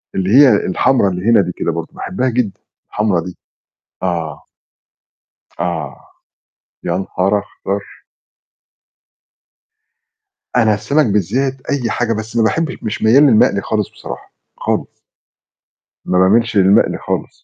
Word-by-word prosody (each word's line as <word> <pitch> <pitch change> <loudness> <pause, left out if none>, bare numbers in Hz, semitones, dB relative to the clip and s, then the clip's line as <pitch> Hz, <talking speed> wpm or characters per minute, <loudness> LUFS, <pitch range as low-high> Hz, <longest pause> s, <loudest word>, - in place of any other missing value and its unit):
اللي 95 0 -1
هي 140 -1 +8
الحمرا 100 +2 +2
اللي 90 +2 -5
هنا 110 -3 +6
دي 90 -1 -3
كده 85 - -2
برضه، 80 0 -4
باحبها 130 -8 -2
جدًا 115 -5 -2 0.3
الحمرا 105 -5 0
دي. 90 +1 -9 0.7
آه. 80 -5 -3 1.1
آه. 80 -6 -4 0.8
يانهار 95 +3 0
أخضر! 100 0 -5 2.7
أنا 110 -3 +4
السَمَك 140 +8 +1
بالذات 125 +7 0
أي 125 -5 -1
حاجة 120 -1 0
بس 110 +1 -6
ما 115 - +3
باحبش 160 +8 0
مش 105 - -4
ميّال 125 +7 +5
للمقلي 105 -6 +4
خالص 105 -2 -2
بصراحة، - - -10 0.2
خالص. - - -3 1.1
ما 90 - +1
باميلش 110 +4 +3
للمقلي 95 +1 +4
خالص. - - -5
105 Hz, 115 wpm, -17 LUFS, 90-115 Hz, 2.7 s, هي